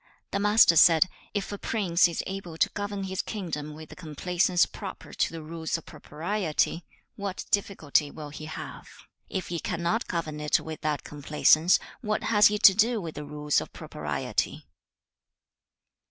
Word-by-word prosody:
The 200 Hz, -, 0 dB
Master 210 Hz, -3 st, +6 dB
said, 165 Hz, +2 st, +7 dB, 0.3 s
'Is 205 Hz, -, -2 dB
a 205 Hz, -, -5 dB
prince 185 Hz, -6 st, +2 dB
is 170 Hz, -, -3 dB
able 190 Hz, -4 st, -6 dB
to -, -, +3 dB
govern 205 Hz, -1 st, -4 dB
his 190 Hz, -1 st, -2 dB
kingdom 155 Hz, -8 st, -5 dB
with 155 Hz, 0 st, -11 dB
the -, -, -11 dB
complaisance 180 Hz, +2 st, +1 dB
proper -, -, -9 dB
to -, -, 0 dB
the 165 Hz, -1 st, -7 dB
rules 160 Hz, +1 st, -3 dB
of 165 Hz, -, -12 dB
propriety, 165 Hz, 0 st, -2 dB, 0.3 s
what 200 Hz, -2 st, -4 dB
difficulty 160 Hz, -7 st, +1 dB
will 150 Hz, 0 st, -8 dB
he 155 Hz, +1 st, -8 dB
have? 155 Hz, -, -8 dB, 0.4 s
If 190 Hz, -2 st, -4 dB
he 170 Hz, -1 st, -2 dB
cannot 175 Hz, +8 st, -1 dB
govern 160 Hz, -3 st, -3 dB
it 150 Hz, 0 st, +2 dB
with 160 Hz, -1 st, -7 dB
that 150 Hz, -2 st, -1 dB
complaisance, 150 Hz, +3 st, +3 dB, 0.2 s
what 215 Hz, -3 st, -1 dB
has 210 Hz, -2 st, +6 dB
he 210 Hz, -, 0 dB
to 195 Hz, -, +8 dB
do 225 Hz, +3 st, +2 dB
with 165 Hz, -5 st, -6 dB
the 150 Hz, +1 st, -7 dB
rules 150 Hz, 0 st, 0 dB
of -, -, -9 dB
propriety?' -, -, -3 dB
170 Hz, 165 wpm, -27 LUFS, 155-200 Hz, 0.4 s, to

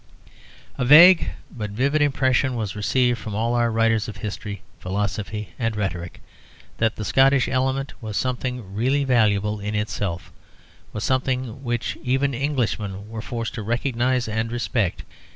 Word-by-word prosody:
A -, -, +1 dB
vague, 165 Hz, +7 st, +8 dB, 0.3 s
but 105 Hz, -4 st, -4 dB
vivid 140 Hz, +8 st, +1 dB
impression 130 Hz, -2 st, +2 dB
was 110 Hz, -3 st, -3 dB
received 120 Hz, +3 st, +1 dB
from 105 Hz, -2 st, -6 dB
all 115 Hz, +3 st, 0 dB
our 120 Hz, -1 st, +2 dB
writers 115 Hz, -1 st, +2 dB
of 110 Hz, -, -7 dB
history, 105 Hz, -2 st, -6 dB, 0.2 s
philosophy, 105 Hz, +2 st, -3 dB
and 115 Hz, -3 st, -1 dB
rhetoric 90 Hz, -4 st, -4 dB, 0.6 s
that 110 Hz, 0 st, +1 dB
the 110 Hz, -, -5 dB
Scottish 135 Hz, +4 st, +4 dB
element 135 Hz, +1 st, -1 dB
was 110 Hz, -2 st, -4 dB
something 125 Hz, -5 st, -3 dB
really 130 Hz, +7 st, +1 dB
valuable 105 Hz, -5 st, +2 dB
in 105 Hz, +1 st, -3 dB
itself, 100 Hz, -4 st, -3 dB, 0.6 s
was 105 Hz, -, -5 dB
something 130 Hz, -1 st, -1 dB
which 120 Hz, -2 st, -2 dB
even 135 Hz, +2 st, +1 dB
Englishmen 110 Hz, -7 st, -2 dB
were 110 Hz, -1 st, -5 dB
forced 115 Hz, 0 st, -4 dB
to 120 Hz, -, -5 dB
recognise 120 Hz, +2 st, 0 dB
and 110 Hz, +1 st, -2 dB
respect. 115 Hz, -5 st, -1 dB
115 Hz, 145 wpm, -23 LUFS, 105-130 Hz, 0.6 s, vague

